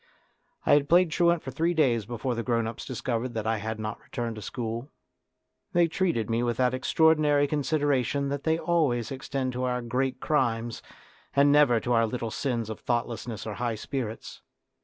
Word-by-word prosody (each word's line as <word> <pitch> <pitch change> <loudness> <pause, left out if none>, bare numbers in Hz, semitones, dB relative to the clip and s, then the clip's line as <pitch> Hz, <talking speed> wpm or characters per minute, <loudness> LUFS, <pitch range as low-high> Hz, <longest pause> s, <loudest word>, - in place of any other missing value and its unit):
I - - +5
had 145 -1 +3
played 175 -1 +5
truant 170 0 +2
for 130 - -5
three 170 +5 0
days 120 -9 +2
before 120 +2 -2
the 115 - -2
grown 115 -1 0
ups 115 0 -6
discovered 120 -1 -3
that 110 -1 -2
I 110 0 +1
had 110 +1 -4
not 110 +1 -5
returned 120 -2 -4
to - - -6
school. 115 +5 -4 0.8
They 175 -1 +4
treated 165 - 0
me 115 +1 0
with 120 -1 -1
that 125 -1 +2
extraordinary 150 +1 +3
consideration 145 -2 0
that 140 0 -2
they 160 +1 +1
always 145 -10 +1
extended 130 -1 -3
to 125 +1 -2
our 125 -1 -1
great 130 +2 -1
crimes 120 -6 0 0.5
and 140 +1 +5
never 145 -5 +5
to 120 - 0
our 115 -1 +3
little 115 -1 -4
sins 120 -4 -2
of 110 - -7
thoughtlessness 120 -2 -3
or 110 - -4
high 115 +2 -2
spirits. 115 0 -5
125 Hz, 180 wpm, -27 LUFS, 115-145 Hz, 0.8 s, I